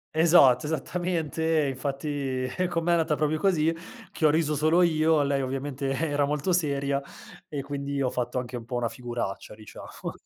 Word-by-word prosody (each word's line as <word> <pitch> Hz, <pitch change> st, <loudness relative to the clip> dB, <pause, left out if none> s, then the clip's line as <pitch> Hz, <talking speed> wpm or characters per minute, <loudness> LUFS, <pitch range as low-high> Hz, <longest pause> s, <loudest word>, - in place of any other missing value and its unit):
Esatto, 155 Hz, -6 st, +5 dB
esattamente. 160 Hz, -1 st, -1 dB
Infatti 135 Hz, -1 st, -3 dB, 0.2 s
con 170 Hz, -2 st, -2 dB
me 175 Hz, -, -1 dB
è -, -, +5 dB
andata 160 Hz, -2 st, +1 dB
proprio 155 Hz, +1 st, 0 dB
così, 165 Hz, -4 st, +2 dB, 0.4 s
che 160 Hz, -, -1 dB
ho -, -, +7 dB
riso 155 Hz, -1 st, +1 dB
solo 160 Hz, +4 st, +3 dB
io. 160 Hz, -2 st, +3 dB
Lei 140 Hz, -1 st, 0 dB
ovviamente 135 Hz, +1 st, -3 dB
era 145 Hz, -1 st, 0 dB
molto 150 Hz, +5 st, -1 dB
seria 140 Hz, -4 st, 0 dB, 0.5 s
e 145 Hz, -2 st, -4 dB
quindi 140 Hz, 0 st, -4 dB
ho 130 Hz, -, +1 dB
fatto 125 Hz, 0 st, -3 dB
anche 125 Hz, 0 st, -4 dB
un 115 Hz, -, -9 dB
po' 125 Hz, -, -5 dB
una 120 Hz, -1 st, 0 dB
figuraccia, 120 Hz, -4 st, -5 dB
diciamo. 105 Hz, -1 st, -9 dB
145 Hz, 170 wpm, -27 LUFS, 130-160 Hz, 0.5 s, ho